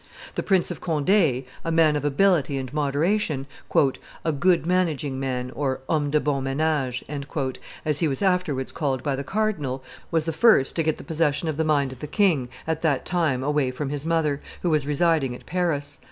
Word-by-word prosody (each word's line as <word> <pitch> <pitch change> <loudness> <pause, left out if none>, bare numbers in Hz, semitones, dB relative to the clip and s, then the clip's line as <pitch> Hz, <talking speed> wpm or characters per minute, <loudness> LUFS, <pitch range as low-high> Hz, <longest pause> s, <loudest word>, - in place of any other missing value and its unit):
The - - -1
Prince 190 -3 +2
of - - -7
Conde, 155 -2 -1
a 145 -5 +1
man 160 -2 +4
of 145 - -1
ability 145 -1 +2
and 130 0 -5
moderation, 150 +1 0 0.8
"a 160 - +2
good 170 +4 +2
managing 160 -7 0
man 125 -2 -2
(homme 145 +2 -1
de 150 +1 +3
bon 140 -2 -1
menage)," 135 -2 0 0.8
as 150 -2 0
he 165 - +2
was 135 +5 -2
afterwards 180 -9 +1
called 135 -4 -2
by 140 -3 0
the 140 - -4
cardinal, 150 -11 -1 0.3
was 160 -2 +1
the 165 - -1
first 215 - +4
to - - +3
get 155 -1 -1
possession 160 -1 0
of 150 - -3
the 160 - +2
mind 140 -4 +1
of 130 - -14
the 150 - -5
king, 160 - +2 0.2
at 160 0 -2
that 145 -5 +1
time 155 -8 0
away 145 -2 +1
from 135 +2 -4
his 145 -1 -3
mother, 160 -3 0 0.2
who 175 - +2
was 150 -2 +1
residing 150 -4 +2
at - - -13
Paris. 150 -5 -1
150 Hz, 185 wpm, -24 LUFS, 135-165 Hz, 0.8 s, man